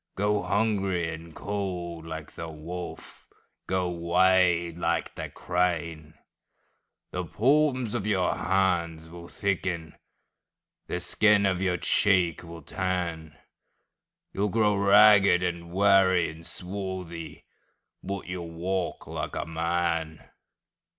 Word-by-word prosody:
Go 105 +1 +1
hungry 100 -6 0
and 80 0 -10
cold 90 -5 -4
like 80 -2 -7
the 80 - -7
wolf, 85 +3 -8 0.4
Go 95 -1 0
wade 85 0 +3
like 85 -1 -1
the - - -6
crane:The 85 -3 -5
palms 130 -1 +2
of 110 -4 -2
your 95 -4 +1
hands 85 -4 0
will 85 0 -10
thicken, 90 -5 -2 0.9
The 90 - -2
skin 100 +3 +3
of 95 -1 +1
your 90 -2 +1
cheek 90 -2 +2
will 85 -2 -10
tan, 85 -3 -3 1.0
You 100 - 0
'll - - 0
grow 105 0 +2
ragged 100 -2 +6
and 85 -1 -3
weary 95 -2 +4
and 80 +2 -12
swarthy, 90 -4 -6 0.6
But 100 0 -5
you 90 0 -5
'll 85 - -7
walk 90 +2 -3
like - - -5
a - - -2
man! 80 -1 -2
90 Hz, 115 wpm, -27 LUFS, 85-100 Hz, 1.0 s, ragged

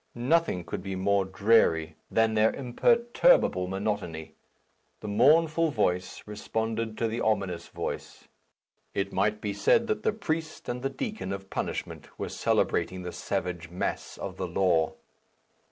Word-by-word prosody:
Nothing 130 - +1
could - - -5
be 95 0 -4
more 100 +1 +2
dreary 95 -5 +3
than 115 0 +2
their 110 +1 +4
imperturbable 235 - +3
monotony. 95 -5 -3 0.7
The 105 - -7
mournful 155 +9 +4
voice 90 -8 -1
responded 110 +1 -3
to 115 - +1
the 115 +1 -3
ominous 95 -6 0
voice; - - -6 0.7
it 100 0 -1
might 105 +2 +1
be 105 -1 -2
said 100 - +3
that 215 -2 -1
the - - +2
priest 165 -7 -4
and 125 0 -3
the 135 - -1
deacon 210 - -4
of 95 0 -6
punishment - - -4
were - - -4
celebrating 90 0 0
the 90 - -5
savage 90 -1 -3
mass 90 - -3
of 95 -1 -6
the 95 - -2
law. 85 -2 +2
105 Hz, 140 wpm, -28 LUFS, 95-130 Hz, 0.7 s, their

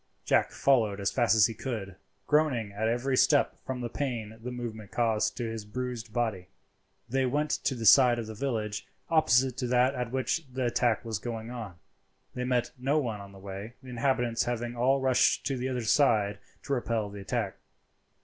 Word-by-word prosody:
Jack - - +3
followed 110 -7 +2
as 100 0 0
fast 120 -3 +3
as 110 -2 +6
he 115 - -1
could, 110 -5 -5 0.3
groaning 140 -9 +2
at 105 +2 -1
every 120 +4 0
step - - +3
from 130 -1 -3
the 120 - -2
pain 120 -5 -4
the 125 - -5
movement 115 -4 -6
caused 115 -3 0
to 120 - -2
his 110 -1 -5
bruised 120 +1 -5
body. 110 -6 -2 0.6
They 130 +2 +1
went 150 +4 0
to 135 - 0
the 115 -2 -4
side 125 0 +7
of 115 - -3
the 110 - -7
village 110 -4 -3 0.2
opposite 130 -5 +3
to 125 - -2
that 125 +2 +3
at 125 -3 -3
which 130 +5 -1
the 130 0 -2
attack 120 -1 +1
was 110 -3 -2
going 115 0 -5
on. 110 -7 -7 0.6
They 125 - -3
met 125 -1 0
no 135 +4 +1
one 115 -8 -2
on 100 0 -11
the 100 - -14
way, 100 +4 -8
the 130 - -11
inhabitants 120 -1 0
having 120 0 -3
all 130 +3 +3
rushed 130 -1 +3
to 135 - 0
the 130 +1 -2
other 125 -2 -2
side 110 -6 +3 0.2
to 140 - -2
repel 115 -5 -1
the 100 0 -8
attack. 105 -1 -2
120 Hz, 195 wpm, -29 LUFS, 110-130 Hz, 0.6 s, side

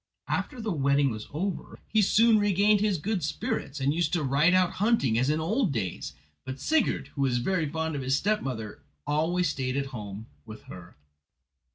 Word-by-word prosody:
After 255 - -2
the 220 -2 -2
wedding 140 -3 +2
was 110 -1 -7
over 180 +5 -4
he 220 - +2
soon 220 +2 +5
regained 205 +1 +3
his 205 -2 +1
good 195 +4 -2
spirits, 145 -1 -3
and 140 +2 +1
used 165 -1 0
to 170 -4 +1
ride 145 +6 +3
out 185 -1 +3
hunting 205 - +2
as 125 +4 +2
in 155 +1 +1
old 210 - 0
days; 100 -9 -4 0.3
but 130 +1 -6
Sigurd, 315 - 0
who 140 - -5
was 130 -3 +2
very 160 +5 0
fond 160 0 -2
of 140 - -3
his 130 +1 +1
stepmother, 135 - -2 0.2
always 160 +4 +1
stayed 130 -1 -2
at 140 - 0
home 105 -1 -7 0.2
with 110 +5 -11
her. 90 -1 -12
150 Hz, 185 wpm, -27 LUFS, 130-195 Hz, 0.3 s, soon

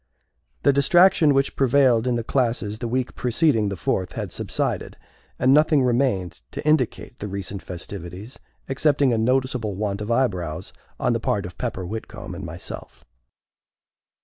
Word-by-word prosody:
The 140 - +5
distraction 160 +3 +5
which 135 0 +1
prevailed 130 -3 +3
in 125 - +1
the 115 - -1
classes 115 -4 -1
the 120 - -3
week 125 +2 -1
preceding 125 -4 +2
the 100 - -3
Fourth 90 +2 -1
had - - -4
subsided, - - -2 0.4
and 130 +1 +4
nothing 150 -1 +4
remained 120 - 0
to - - -5
indicate 130 -4 0
the 105 - -4
recent 100 -1 -4
festivities, 90 +4 -8 0.3
excepting 140 -1 +2
a 115 - +1
noticeable 125 -3 0
want 100 0 -2
of 105 - -5
eyebrows 95 -11 -1 0.3
on - - +2
the - - 0
part - - -1
of - - -8
Pepper 95 - -3
Whitcomb 110 +5 -7
and - - -7
myself. - - -8
120 Hz, 150 wpm, -23 LUFS, 100-135 Hz, 0.4 s, The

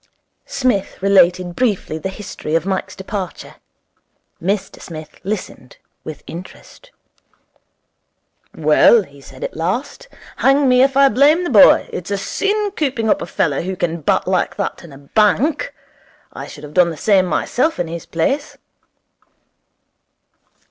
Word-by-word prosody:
Psmith 250 -7 -1
related 180 -2 +3
briefly 205 -10 -1
the 190 - -4
history 190 -5 -5
of 165 +1 +1
Mike's 190 -1 -3
departure. 190 -1 -6 0.8
Mr 195 +3 -2
Smith 155 -2 -10
listened 195 -10 -6 0.3
with 155 -2 -8
interest. 185 - -11 1.7
'Well,' 155 +8 +5
he 140 -5 -17
said 130 -1 -12
at - - -5
last, 250 - -3 0.3
'hang 275 +1 +3
me 250 0 +5
if 270 0 +3
I 275 0 +7
blame 285 +8 +4
the 345 - -3
boy. 205 -5 +6
It's 180 - -5
a 200 - -1
sin 410 - -1
cooping 255 -7 0
up - - +1
a - - -5
fellow 145 -5 0
who 190 +2 -4
can 170 -2 -2
bat - - +1
like - - 0
that - - -4
in 170 - -12
a 135 - -12
bank. 210 - +1 0.6
I - - -7
should 145 - -12
have 150 0 -10
done 180 -2 +4
the 160 - -6
same 190 +1 +3
myself 255 - 0
in 175 - -1
his 165 0 -7
place.' 275 - -2
190 Hz, 145 wpm, -18 LUFS, 165-255 Hz, 1.7 s, I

